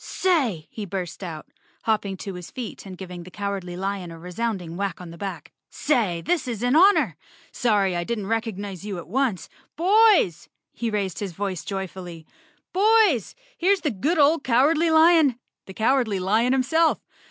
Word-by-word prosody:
"Say!" 260 - 0
he 215 - -6
burst 185 -1 -5
out, 160 -4 -6 0.4
hopping 210 -3 0
to 195 +1 -6
his 180 -1 -8
feet 235 -5 -7
and 185 -1 -9
giving 180 -2 -8
the 175 - -11
Cowardly 195 -3 -4
Lion 195 -1 -3
a 165 - -9
resounding 180 0 -4
whack 195 -1 -3
on 180 -2 -9
the - - -10
back, 195 +2 -6
" - - -63
say, 220 - 0
this 315 - -1
is 235 -2 -4
an 245 +3 +2
honor. 385 +5 +5 0.4
Sorry 205 -6 +1
I 175 - -1
didn't 215 +1 -3
recognize 205 -4 -3
you 205 -3 -5
at 170 - -8
once. 240 -2 -1 0.3
Boys!" 390 - +4 0.2
He 235 - -3
raised 200 -4 -2
his 195 -4 -4
voice 190 -3 -3
joyfully, 185 -4 -6 0.5
"Boys, 405 - +3 0.2
here's 385 +2 +2
the 300 - 0
good 285 - 0
old 300 +1 +4
Cowardly 300 +7 +3
lion, 320 -4 +5 0.3
the 190 - -9
Cowardly 230 -3 +2
Lion 215 +7 +2
himself. 320 +5 +2
210 Hz, 170 wpm, -24 LUFS, 185-275 Hz, 0.5 s, honor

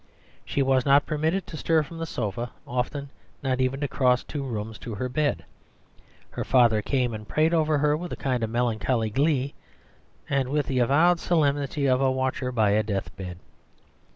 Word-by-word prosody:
She 140 - 0
was 130 -1 +3
not 140 +1 +4
permitted 160 +5 -1
to 155 - -8
stir 160 0 +2
from 165 +3 -10
the 165 - -3
sofa, 120 -1 -3 0.2
often 135 +3 -3 0.3
not 130 -1 0
even 130 +1 0
to 145 - 0
cross 125 -2 +2
two 145 - -5
rooms 110 -4 -5
to 115 -3 -6
her 125 +5 -2
bed. 145 +3 -1 0.9
Her - - -3
father 120 -4 +4
came 125 0 0
and 110 -1 -7
prayed 155 +7 +2
over 155 -2 +2
her 150 +1 +2
with 175 +3 -5
a - - -2
kind 130 -4 -1
of 110 - -1
melancholy 115 -1 0
glee, 140 +1 +1 0.7
and 135 -2 0
with 145 0 0
the 130 -2 -1
avowed 160 +8 +4
solemnity 145 -4 +1
of 130 -1 +3
a 135 - +3
watcher 130 0 -1
by 110 -4 +2
a 105 +1 +3
deathbed. 95 -3 -5
130 Hz, 180 wpm, -26 LUFS, 120-150 Hz, 0.9 s, not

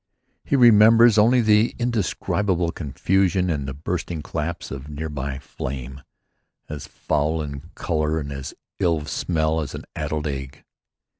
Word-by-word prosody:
He - - 0
remembers 115 -2 +7
only 120 +4 +5
the 110 +1 +3
indescribable 100 -6 0
confusion 90 +4 0
and 70 -4 -2
the 65 - -5
bursting 80 +1 -4
claps 85 +3 -4
of 70 +2 -7
near 75 +2 -5
by 70 -2 -4
flame, 65 -1 -6 0.7
as 75 -1 -7
foul 75 +2 -1
in 70 +2 -8
color 80 -1 -1
and 70 -2 -6
as 70 -1 -6 0.2
ill 85 -4 +2
of 75 0 -6
smell 80 -2 0
as 70 -3 -5
an - - -7
addled 75 0 -3
egg. 70 -1 -5
80 Hz, 145 wpm, -23 LUFS, 70-95 Hz, 0.7 s, remembers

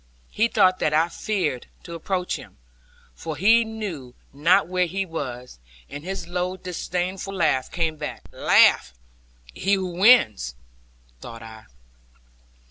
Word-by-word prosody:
He 225 +2 +2
thought 185 -5 +3
that 150 - +1
I 165 +2 +3
feared 170 - -2 0.2
to 170 - -9
approach 180 +2 -2
him, - - -12 0.6
for 155 - -6
he 225 +8 +5
knew 195 - -7 0.2
not 155 +6 +3
where 180 0 0
he 195 +3 -2
was: 125 - -7 0.3
and 145 - -7
his 185 -1 -5
low 180 +1 -3
disdainful 185 +2 -4
laugh 155 -7 +1
came 165 -2 -2
back. - - -6
'Laugh - - +4 0.6
he 195 - 0
who 190 -1 +1
wins,' 170 - +4 0.6
thought 115 - -10
I. 110 -1 -12
175 Hz, 130 wpm, -23 LUFS, 145-190 Hz, 0.6 s, he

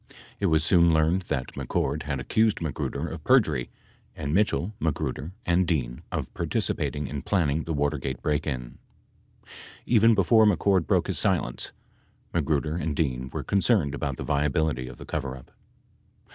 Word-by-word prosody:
It 100 - +1
was 80 -2 +3
soon 85 0 +5
learned 80 +4 +2
that 65 - -2
McCord - - -1
had 70 -2 -1
accused 110 +10 +1
Magruder 80 -4 -3
of - - -7
perjury - - +3 0.5
and 75 -1 -3
Mitchell, 100 -1 +1
Magruder 75 0 -2
and 90 +1 +2
Dean 65 -7 -1
of - - -4
participating 75 0 -1
in 70 +1 -4
planning 80 -6 0
the 80 - -2
Watergate 70 -3 -1
break 75 +1 -1
in. 60 -4 -5 1.1
Even 115 -1 +5
before 110 +3 +5
Mc 105 - +3
Cord 95 -4 +2
broke - - +2
his - - -1
silence, - - 0 0.6
Magruder 75 0 0
and 80 -3 -2
Dean 65 -4 -1
were - - -4
concerned 95 - +2
about 70 -2 -3
the - - -5
viability 70 -2 0
of 60 - -10
the - - -10
coverup. 65 -4 -5
75 Hz, 155 wpm, -26 LUFS, 70-90 Hz, 1.1 s, soon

